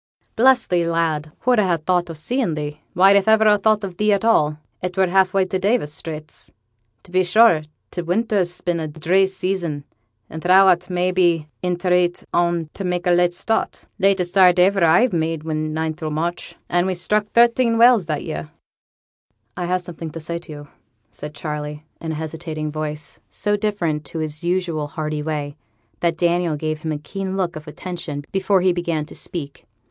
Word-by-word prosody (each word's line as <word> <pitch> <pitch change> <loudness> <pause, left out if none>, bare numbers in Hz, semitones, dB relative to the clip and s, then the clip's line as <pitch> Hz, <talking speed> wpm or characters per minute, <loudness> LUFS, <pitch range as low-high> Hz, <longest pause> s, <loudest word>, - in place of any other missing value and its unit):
'Bless 255 +1 +4
thee, 175 -1 +1
lad! 165 -2 -1
who'd 245 -2 +3
ha' 185 -5 +2
thought 175 +2 0
o' - - -5
seein' 180 - -1
thee? 150 0 -5
Why, 190 +2 +6
if 200 0 +3
iver 220 0 +5
a 210 -1 +5
thought 215 0 +2
on 190 - -6
thee 210 0 +3
at 200 +2 0
all, 155 -10 +3 0.2
it 180 0 -4
were 190 - +4
half 185 +1 +3
way 195 -1 +2
to 185 0 -2
Davis' 195 -6 0
Straits. 155 -1 -8 0.5
To - - -17
be 185 +1 +3
sure, 180 -2 +5 0.3
t' 175 - -3
winter's 180 0 0
been 175 -1 -1
a 160 - -3
dree 170 +6 +2
season, 185 -6 -3 0.4
and 160 - -8
thou'rt, 180 0 +5
may 180 0 0
be, 175 -4 +2 0.2
i' 180 -1 0
t' 175 +2 -5
reet 180 -1 +2
on 170 -1 +1
't 155 - -26
to 195 - -6
mak' 180 0 -2
a 180 - +3
late 175 0 +3
start. 220 +4 -2
Latest 190 -2 +2
start 185 -2 +5
as 185 +3 +4
iver 195 - +1
I 170 +10 +5
made 165 -2 -1
was 160 -1 -3
ninth 155 +1 -3
o' 155 - -2
March, 165 +3 -3
an' 175 +1 +1
we 185 - -1
struck 210 +4 0
thirteen 235 +1 +3
whales 230 -6 +5
that 150 -2 -2
year.' 75 0 -5 1.1
'I 180 - -3
have 180 +1 0
something 170 -2 -7
to 165 - -8
say 170 +2 -4
to 170 -2 -13
you,' 145 -1 -9 0.4
said 150 +7 -9
Charley, 150 0 -5 0.2
in 160 -1 -3
a - - -4
hesitating 155 -1 -5
voice, 150 0 -5
so 205 0 0
different 190 -8 -1
to 165 - -7
his 155 -1 -3
usual 175 -4 -1
hearty 150 0 -4
way, 150 -2 -4 0.4
that 170 -1 0
Daniel 175 -1 +1
gave 155 +1 -3
him 160 0 -4
a 150 - -2
keen 190 +5 -5
look 180 -3 -1
of 155 0 -9
attention 160 -3 -6
before 195 0 +2
he 185 0 +3
began 170 -3 -2
to - - -12
speak. 145 -9 -7
175 Hz, 200 wpm, -21 LUFS, 155-190 Hz, 1.1 s, Why